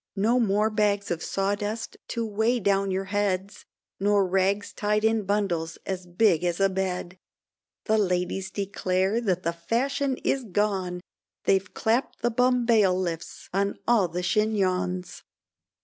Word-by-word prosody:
No 225 +5 +2
more 210 -1 +2
bags 205 -2 +1
of 165 -2 -2
sawdust 205 +3 -2
to 230 -1 -2
way 220 +3 +1
down 195 -1 +1
your 190 +1 -1
heads, 200 -1 -1 0.3
Nor 200 0 +3
rags 195 +2 +1
tied 210 +1 0
in 220 -2 +2
bundles 175 -5 -1
as 185 -2 -4
big 175 -1 +3
as 175 0 0
a 195 0 +4
bed, 185 -1 -3 0.7
The 220 -1 +2
ladies 180 0 -1
declare 190 +2 0
that 185 -5 0
the 170 - 0
fashion 260 +9 -1
is 270 - +1
gone, 190 -4 -1 0.4
They've 195 0 +1
clapp'd 230 +3 -1
the 240 - +2
bumbailiffs 220 -9 +1
on 200 +1 0
all 225 -6 +4
the 175 +2 -4
chignons. 185 -3 0
200 Hz, 135 wpm, -26 LUFS, 185-215 Hz, 0.7 s, a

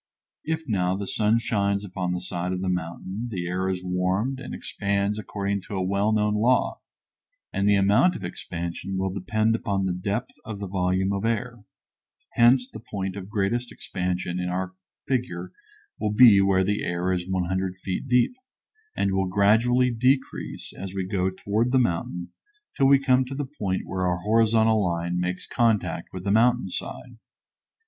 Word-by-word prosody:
If 160 0 -2
now 95 -4 +1
the 100 - -4
sun 105 +3 +2
shines 100 -3 0
upon 90 -2 -3
the 90 0 -2
side 90 0 -3
of 90 - -3
the 95 - -1
mountain 90 +5 -3
the 90 -6 -3
air 90 +2 -1
is 95 -1 -3
warmed 95 +8 0
and 135 - -7
expands 100 +1 -1
according 100 -1 -2
to 105 - -5
a 95 - 0
well 100 +3 +1
known 105 -1 +2
law, 115 +5 +2 0.7
and 100 +1 +2
the 100 - +5
amount 105 - +4
of - - -7
expansion 85 +2 -5
will 95 0 -1
depend 110 +3 +1
upon 100 -3 -1
the 95 - 0
depth 100 +7 -3
of 110 -4 -6
the 100 - -5
volume 95 +1 0
of 100 +1 -2
air; 115 -1 -2 0.7
hence 125 +2 +5
the 110 - -10
point 95 -4 -4
of 100 -1 -7
greatest 115 +4 -1
expansion 90 -6 -3
in 90 0 -2
our 95 +1 -2 0.3
figure 105 -9 -2 0.5
will 105 -1 0
be 105 -3 +8
where 95 -1 +3
the 105 +2 0
air 90 +1 -1
is 90 0 -3
100 95 0 -1
feet 95 +6 -4
deep, 125 - +3 0.6
and 100 - +1
will 95 0 +1
gradually 115 +6 +3
decrease 130 +3 -1
as 95 0 -7
we 95 -1 -1
go 95 -1 0
toward 105 +5 -1
the 130 - +4
mountain 90 -6 -1 0.4
till 135 - +4
we 140 0 +7
come 130 -1 +3
to 130 +1 -7
the 145 +1 -2
point 100 -9 -3
where 95 -1 -1
our 90 0 -1
horizontal 110 0 +3
line 85 0 -1
makes 90 +1 -2
contact 115 -4 0
with 90 -1 -7
the 100 - 0
mountain 120 -1 +3
side. 120 +4 -6
100 Hz, 175 wpm, -25 LUFS, 90-115 Hz, 0.7 s, be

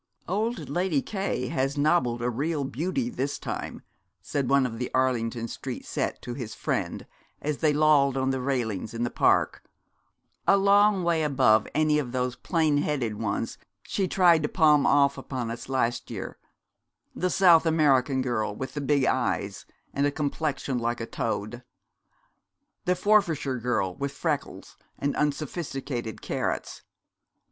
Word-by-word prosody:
'Old 220 +6 -2
Lady 175 -4 0
K 190 - -3
has 135 +3 -1
nobbled 140 -6 +2
a 120 - +1
real 145 +5 -1
beauty, 175 - -2
this 145 - -3
time,' - - -6 0.4
said 140 -3 -2
one 140 -1 +4
of 115 -2 -4
the 125 - -2
Arlington 120 -3 0
Street - - -6
set - - -2
to 120 - -5
his 120 -4 -6
friend - - -2 0.3
as 150 -1 -3
they 155 -2 +3
lolled 145 -3 +4
on 130 0 +1
the 130 -1 -2
railings 115 -6 -2
in 115 - -2
the 120 - -1
park, - - +2 0.8
'a 200 - +6
long 200 0 +4
way 170 -2 +2
above 130 -8 +3
any 155 0 +3
of 130 -4 -4
those 125 -1 -1
plain 160 -4 +1
headed 135 -7 -1
ones - - -2 0.2
she 195 -2 -1
tried 175 -4 +4
to 150 - -1
palm 150 -4 +4
off 140 0 +3
upon 125 -4 -4
us 120 +2 -7
last 120 -3 -1
year: - - -6 0.7
the 185 - -1
South 175 -3 +5
American 140 -4 +3
girl 110 -5 -1
with 130 +3 -6
the 145 - -3
big 140 -1 +2
eyes - - -1 0.3
and 140 +1 +2
a - - 0
complexion 145 -3 -2
like 120 +1 -1
a 115 - -3
toad, 115 +2 -3 1.2
the 180 - +2
Forfarshire 175 - +2
girl 115 -6 0
with 140 +5 -4
freckles - - -4 0.2
and 140 0 -1
unsophisticated 140 - -3
carrots. - - -3
140 Hz, 155 wpm, -26 LUFS, 125-160 Hz, 1.2 s, a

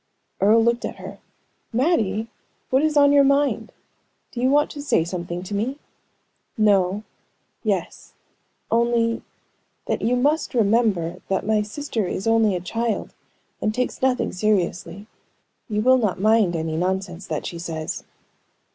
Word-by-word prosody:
Earle 220 +3 +5
looked 235 +1 +1
at - - -4
her. - - -10 0.5
"Mattie! 225 - +1 0.4
What 265 +1 +4
is 310 -1 +1
on 285 0 +6
your 285 -1 +6
mind? 280 +1 +1 0.6
Do 240 - -5
you 255 - +3
want 290 +2 +3
to 290 - -7
say 285 - +2
something 175 0 -5
to 190 - -7
me?" 230 +7 -1 0.8
"No 200 -2 +3 0.6
yes - - -3 0.6
only 230 0 +2 0.6
that - - -2
you 240 +3 +2
must 290 +3 +1
remember 210 -6 +1
that 190 - -1
my 215 0 +2
sister 220 -1 -3
is 190 - -4
only 225 -3 +3
a - - -1
child, 225 +5 -3 0.5
and 215 - 0
takes 250 0 -2
nothing 260 -1 +1
seriously. 185 -1 -1 0.6
You 210 0 0
will 255 +1 +5
not 205 -6 -1
mind 215 -3 +3
any 160 -1 -2
nonsense 185 +1 -2
that - - -3
she 170 - -5
says." 160 -2 -4
220 Hz, 145 wpm, -23 LUFS, 190-250 Hz, 0.8 s, on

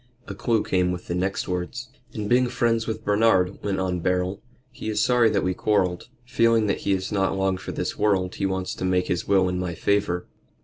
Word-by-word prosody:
A - - -5
clue 115 -3 0
came 90 -1 +1
with 90 0 -5
the - - -3
next 95 +4 -1
words. 90 +8 -4 0.2
"And 105 -2 -4
being 125 +3 +3
friends 115 -2 0
with 110 0 -4
Bernard," 100 -3 +2
went 100 -2 -1
on 90 -1 -1
Beryl, 90 +2 -1 0.3
"he 110 - -6
is 105 -1 -1
sorry 120 0 +4
that 100 -2 0
we 90 - 0
quarrelled. 90 -3 0 0.2
Feeling 115 -3 +3
that 100 - 0
he 100 - 0
is 95 +1 -2
not 95 -1 0
long 95 0 +1
for 95 - -7
this - - -4
world 95 -3 +1
he 100 - -1
wants 95 -1 -2
to - - -6
make 90 -1 +1
his 90 0 -1
will 95 -2 +3
in 90 0 -2
my 90 -2 -3
favor." 100 -2 0
95 Hz, 220 wpm, -24 LUFS, 90-110 Hz, 0.3 s, sorry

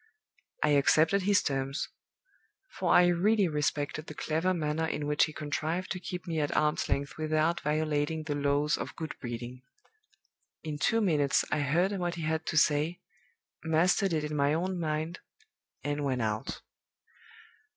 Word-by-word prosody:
"I 150 - +3
accepted 155 +6 +4
his 200 +2 +3
terms; 135 0 -2 0.8
for - - -1
I 180 - +7
really 195 +3 +3
respected 150 0 -2
the 155 - -8
clever 165 +5 0
manner 160 -2 -1
in 150 -2 -3
which 150 0 +3
he - - -7
contrived 155 +4 -3
to 185 - -2
keep 180 +1 -6
me 165 -3 -2
at 145 -1 0
arms 150 0 +1
length 140 +2 -2
without 155 +2 +1
violating 155 +1 0
the 150 -1 -2
laws 145 +1 +1
of - - -5
good 160 -1 -5
breeding. 120 0 -6 1.0
In 150 -2 -4
two 225 +10 +2
minutes 150 -8 +2
I 155 - +1
heard 165 +7 +2
what 175 -3 -2
he 165 - -5
had 160 0 -1
to 155 - -1
say, 150 +3 +2 0.6
mastered 175 +4 +2
it 155 -2 0
in 150 0 -3
my 145 +1 +2
own 180 +2 -2
mind, 160 +2 -2 0.6
and 145 0 -2
went 130 -4 0
out. 110 0 -3
155 Hz, 160 wpm, -30 LUFS, 145-170 Hz, 1.0 s, I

